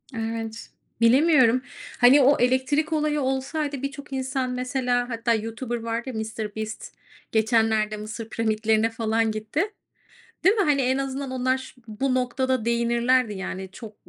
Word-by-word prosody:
Evet. 225 0 -4 0.3
Bilemiyorum. 255 -1 +5 0.4
Hani, 260 +4 +7
o 280 +3 +5
elektrik 260 +5 +1
olayı 300 -1 +1
olsaydı 270 +2 -2
birçok 280 0 -6
insan, 260 -1 -2
mesela, 250 -1 -1
hatta 230 0 0
YouTuber 225 +2 -3
vardı 230 +2 -3
ya, - - -6
Mr. 220 -1 -5
Beast, 220 0 -6 0.4
geçenlerde 220 -1 +2
Mısır 215 +1 -7
piramitlerine 220 0 +1
falan 225 0 0
gitti. 215 +9 -2 0.8
Değil 390 +5 +5
mi? 405 - +2
Hani, 285 -3 +2
en 260 +1 +1
azından 270 0 -3
onlar 255 0 +1
şu 260 -1 -12
bu 255 +5 -1
noktada 255 -1 0
değinirlerdi, 235 0 +2
yani, 190 0 -5
çok 215 0 -10
245 Hz, 140 wpm, -25 LUFS, 225-265 Hz, 0.8 s, Hani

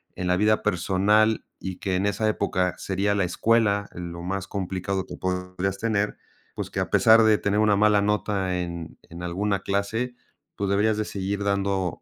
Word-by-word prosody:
en 90 - -4
la 90 - +3
vida 105 +1 +2
personal, 105 +5 +2 0.2
y 95 -1 -4
que 95 -1 -2
en 100 +2 +1
esa 105 +2 0
época 90 -4 0
sería 100 +2 0
la 100 -2 +1
escuela 105 +1 +2
lo 85 -1 -7
más 95 +1 -3
complicado 95 -1 -3
que - - -8
podrías 90 +1 -2
tener, 105 0 -1 0.4
pues, - - -5
que - - -3
a - - -1
pesar 115 0 +6
de 110 -1 +5
tener 100 +1 0
una 105 -1 +4
mala 105 0 +4
nota 100 -3 0
en 85 -2 -6
en 85 +1 -9
alguna 100 +3 -1
clase, 105 +6 -2 0.4
tú 100 - -2
deberías 105 +2 +2
de 110 - -1
seguir 100 0 -3
dando 100 -3 -1
100 Hz, 180 wpm, -25 LUFS, 95-105 Hz, 0.4 s, pesar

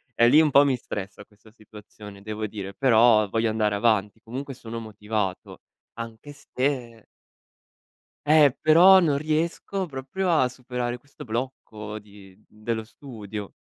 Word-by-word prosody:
Eh, 120 - +5
lì 155 - +7
un 155 - +3
po' 140 +1 +6
mi 135 -2 +2
stressa 105 -3 -7
questa 105 +1 -22
situazione 105 -2 -14
devo 110 +1 -4
dire, 100 -2 -7
però 115 -4 +4
voglio 115 +2 0
andare 105 -1 0
avanti. 105 -1 +1
Comunque 130 +3 -7
sono 115 0 -7
motivato 105 -3 -5 0.4
anche 115 +5 -8
se 130 -5 -4 1.2
Eh, 150 -3 +5
però 175 +5 +7
non 150 -5 +1
riesco 165 +5 -2
proprio 160 +6 -3
a 130 -6 +3
superare 125 -1 -5
questo 140 +3 -14
blocco 110 -3 -6
di 100 -2 -17
dello 110 +1 -4
studio. 110 -5 -9
115 Hz, 135 wpm, -25 LUFS, 105-140 Hz, 1.2 s, lì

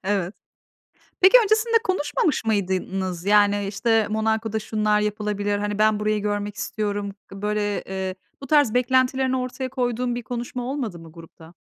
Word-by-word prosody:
Evet. 195 -1 -1 0.9
Peki, 385 +7 +8
öncesinde 440 +2 +2
konuşmamış 295 -6 0
mıydınız? 190 -3 -1
Yani, 205 0 +3
işte, 220 +2 +1
"Monako'da 220 0 0
şunlar 210 -1 0
yapılabilir.", 210 -1 -1
hani, 205 0 -3
"Ben 215 -1 +3
burayı 210 0 0
görmek 205 0 -2
istiyorum." 205 -2 -3 0.2
Böyle, 205 +1 -2
eee, 190 -1 -4 0.3
bu - - -6
tarz 290 -5 +3
beklentilerini 260 +1 +2
ortaya 255 +1 -4
koyduğun 245 -2 -1
bir 240 - -4
konuşma 245 +2 -5
olmadı 240 -11 -4
mı 165 -1 -13
grupta? 165 0 -14
210 Hz, 140 wpm, -23 LUFS, 205-245 Hz, 0.9 s, Peki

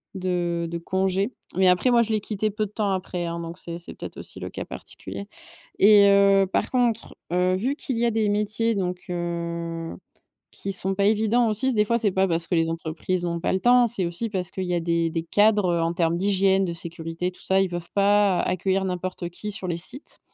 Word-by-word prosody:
de 175 -2 -1
de 170 - -3
congé. 190 +5 0 0.2
Mais 185 0 +5
après 180 +8 +3
moi 240 -1 +5
je 225 -1 -1
l'ai 215 - +2
quitté 215 +1 -2
peu 215 +1 -1
de 200 - -11
temps 210 -2 -1
après 180 -2 -3
hein 170 0 -4
donc 170 +1 -7
c'est 170 -2 -6
c'est 170 - -7
peut-être - - -9
aussi - - -7
le - - -4
cas - - -6
particulier 100 +1 -8 0.5
et 205 0 +7
heu, 200 0 +5
par - - 0
contre, 240 -3 0 0.2
heu, 180 +1 +2
vu 260 +9 -1
qu'il 260 -6 -3
y 235 - +1
a 235 - +2
des 220 -1 +1
métiers 210 +2 0
donc, 180 -2 -3
heu, 170 -1 -4 0.6
qui 195 - -5
sont 190 +1 0
pas 200 +1 +1
évidents 220 +3 +3
aussi, 245 +5 +1
des 210 -1 +3
fois 235 +2 +2
c'est 210 -4 +1
pas 190 +1 +2
parce 165 -1 0
que 175 - 0
les 165 0 +2
entreprises 165 +2 -3
ont 170 -1 -2
pas 170 - -1
le 190 - +1
temps, 245 0 +5
c'est 200 -6 0
aussi 175 +7 -3
parce 185 -3 -3
qu'il 190 - -4
y 180 - -2
a 175 - +1
des 170 0 +1
des 165 0 -3
cadres, 205 +1 +3
heu, 170 - +1
en 165 +1 0
termes 170 -1 +1
d'hygiène, 195 0 +3
de 170 - -3
sécurité 165 +1 -5
et 185 - -2
tout - - -15
ça, 190 0 +2
ils 195 - 0
peuvent 175 -1 -6
pas 200 -2 +3
accueillir 190 +1 0
n'importe 180 -1 -4
qui 210 +4 -6
sur 185 - -5
les 170 - -1
sites. 245 - -4
190 Hz, 235 wpm, -24 LUFS, 170-210 Hz, 0.6 s, et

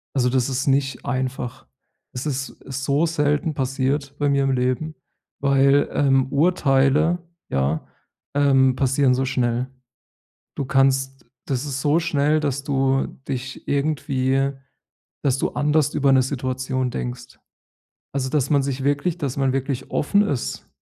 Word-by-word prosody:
Also 125 -2 +2
das 125 -1 +1
ist 130 +3 -2
nicht 135 -1 0
einfach. 130 -1 -3 0.5
Es 125 - -5
ist, 135 -2 -2
äh, - - -9
so 140 +4 +1
selten 150 0 0
passiert 135 +1 -1
bei 145 -1 +2
mir 140 -1 +2
im 135 - +1
Leben, 130 +5 -1 0.5
weil, 140 0 +4
ähm, 135 -2 +2
Urteile 150 0 +3 0.3
ja, 70 +4 0 0.5
ähm 135 -2 +4
passieren 135 0 +2
so 135 +1 0
schnell. 125 -1 0 0.9
Du 140 - -2
kannst 135 0 +1 0.2
das 135 0 -2
ist 135 -2 -3
so 150 +3 +3
schnell, 155 -2 +1
dass 140 -2 -2
du 135 -1 +1 0.2
dich 130 -1 -5
irgendwie 140 -2 0 0.7
dass 135 -2 +2
du - - 0
anders 150 0 +1
über 140 -2 +3
'ne 130 -1 +5
Situation 130 -1 -2
denkst. 125 0 -6 0.8
Also, 130 -2 -1
dass 140 -3 +1
man 140 -2 +4
sich 135 -1 -3
wirklich 145 +5 0
dass 140 -6 -3
man 135 -2 +1
wirklich 135 -1 -3
offen 200 +7 +2
ist 130 - -3
135 Hz, 145 wpm, -22 LUFS, 130-145 Hz, 0.9 s, ne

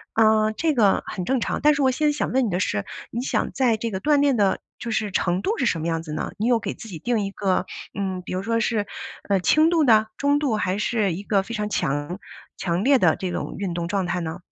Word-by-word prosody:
呃， 220 -1 +4
这 320 +3 +1
个 210 -6 +3
很 185 -4 -4
正 260 +5 +1
常， - - -1
但 300 0 +5
是 285 - -1
我 260 - +4
现 300 +4 +1
在 - - +4
想 295 - -2
问 260 0 +2
你 - - -1
的 180 -1 -1
是， 100 - -1 0.2
你 235 - -3
想 255 - -1
在 250 -4 +2
这 230 +1 -3
个 190 - -3
锻 295 +5 +3
炼 280 -3 +3
的 200 -2 +2 0.2
就 235 - -4
是 215 -2 -1
程 180 0 0
度 435 - -1
是 250 - 0
什 170 -8 +1
么 160 - -2
样 165 -1 -1
子 155 -2 -7
呢？ - - -3
你 215 - -1
有 240 -1 +3
给 - - -4
自 225 - -11
己 170 -5 -7
定 240 +1 0
一 195 - -4
个， 195 -2 0 0.3
嗯， 190 -2 -2
比 - - -6
如 185 +1 -2
说 230 +2 0
是， 220 -3 0 0.4
呃， 200 -1 +2
轻 310 - +4
度 330 -2 +3
的， 220 -4 +5
中 285 +1 +2
度， 275 -7 0
还 195 -2 -1
是 210 -3 0
一 195 +4 -6
个 200 -2 +2
非 235 - -8
常 210 -1 -2
强 145 +1 -2 0.4
强 175 +1 -1
烈 275 +2 +5
的 170 -6 +4
这 185 -2 -4
种 - - -4
运 190 -3 -3
动 170 0 -3
状 195 +1 -1
态 175 +1 -1
呢？ 165 +1 -5
210 Hz, 290 characters per minute, -23 LUFS, 185-245 Hz, 0.4 s, 但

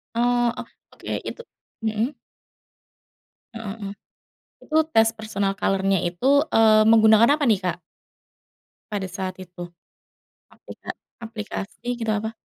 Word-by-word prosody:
Oh 240 0 +2
oh - - -5 0.3
oke - - -14 0.2
itu 475 - -9 0.4
mhm. 220 +3 0 1.4
Heeh 220 -3 -6
heeh, 200 0 -5 0.7
itu 315 - 0
tes 225 0 +5
personal 200 -3 -2
color-nya 195 -1 +1
itu, 260 - +3
eee, 215 -1 +6
menggunakan 225 +5 +6
apa 290 - 0
nih, 210 -4 +4
Kak 175 -1 -2 1.1
pada 200 -2 -2
saat 185 0 -5
itu? 175 -1 -9 0.8
Aplika - - -13 0.3
aplikasi 225 +2 -5
gitu 225 -2 -2
apa? 220 +1 -2
215 Hz, 115 wpm, -23 LUFS, 195-230 Hz, 1.4 s, eee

